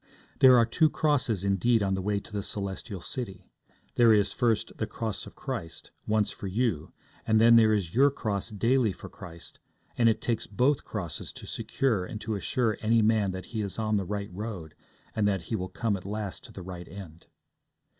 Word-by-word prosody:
There 130 -2 +8
are 115 - +5
two 155 +7 +3
crosses, 135 - +1
indeed, 100 +3 +2
on 95 -1 +1
the 95 - -1
way 100 +1 0
to 105 - -14
the 100 - -1
Celestial 100 -1 -5
City; 110 -2 -6 0.5
there 120 -2 +7
is, 105 -2 +4
first, 115 -4 0
the - - -1
Cross 110 -3 -4
of - - -13
Christ, 80 0 -6 0.2
once 105 -1 +2
for 100 - -7
you, 95 -6 -1 0.4
and 110 0 +4
then 115 +1 +7
there 110 -1 +6
is 95 -6 0
your 140 +4 +6
cross 110 -7 -3
daily 115 +1 +2
for - - -10
Christ, 85 0 -10 0.4
and 115 -1 +4
it 110 - +1
takes 115 -2 -2
both 130 +8 +1
crosses 80 -5 -5
to - - -10
secure 115 -9 -1
and 105 +4 -6
to 110 - -3
assure 110 +2 0
any 115 0 +3
man 110 -2 +3
that 95 0 -5
he 110 - -1
is 100 -2 -4
on 110 -1 +1
the 100 - 0
right 100 0 -4
road, 95 -6 -6 0.4
and 105 -2 +2
that 100 -3 +1
he 110 - -3
will 95 -2 -3
come 115 -4 -1
at 95 - -7
last 105 -1 -4
to - - -12
the 95 - -9
right 90 -1 -8
end. 85 -3 -11
105 Hz, 205 wpm, -28 LUFS, 95-115 Hz, 0.5 s, There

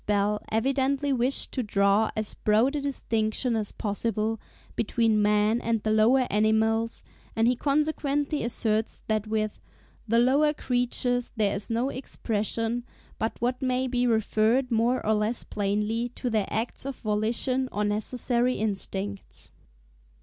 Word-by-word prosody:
Bell 205 0 +1
evidently 270 +4 +1
wished 255 +2 +1
to 260 - -1
draw 200 0 +2
as 215 -1 -3
broad 225 +7 +2
a 290 - -1
distinction 230 -3 -1
as 215 -2 -1
possible 215 +1 -2 0.4
between 225 -1 +1
man 210 +2 +2
and 225 -2 -1
the 215 - 0
lower 235 +5 +4
animals; 220 +2 +1 0.3
and 225 +1 +3
he 250 - +3
consequently 290 +1 0
asserts 220 -2 0
that 215 -1 0
with 215 -1 -2 0.5
"the 230 +2 +2
lower 280 +5 +4
creatures 245 -1 0
there 210 -3 +1
is 200 +3 0
no 235 +4 0
expression 230 -1 -2 0.4
but 225 -1 -2
what 250 +1 -1
may 255 0 0
be 250 -1 0
referred, 225 +3 +2
more 235 +3 +1
or 220 - +3
less 215 +3 0
plainly, 210 +4 -1
to 245 - -3
their 215 -3 +1
acts 225 +3 -3
of 275 0 -4
volition 235 +4 -1
or 210 - -1
necessary 240 +4 +1
instincts." 200 -1 -5
225 Hz, 140 wpm, -27 LUFS, 215-250 Hz, 0.5 s, lower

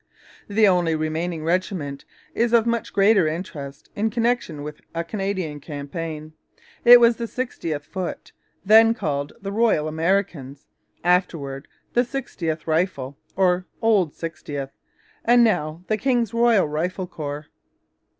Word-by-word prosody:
The 210 +1 +4
only 175 -4 +3
remaining 155 +1 -2
regiment 165 -5 -2 0.3
is 235 +1 +1
of 230 -1 +5
much 235 -1 -1
greater 200 -3 +4
interest 150 -4 -6
in 220 +2 0
connection 230 -10 -1
with 150 0 -8
a 170 - -1
Canadian 190 -5 -3
campaign. 155 +2 -6 0.5
It 245 0 +10
was 235 -1 +5
the 235 - -3
60th 170 - -4
Foot, 185 +3 -6 0.3
then 225 +2 +7
called 145 -7 -2
the 195 - -3
Royal 210 -8 +2
Americans, 160 -4 -1 0.4
afterwards 165 -6 0 0.3
the 245 - +4
Sixtieth 185 - -4
Rifles 160 -5 -1 0.2
or 180 -1 +2
'Old 205 -9 +2
Sixtieth,' 145 -4 -6 0.5
and 240 +1 +5
now 175 -6 0
the 215 - +1
King's 240 -2 0
Royal 230 -6 +4
Rifle 175 +5 -2
Corps. 150 -3 -6
180 Hz, 130 wpm, -23 LUFS, 155-220 Hz, 0.5 s, It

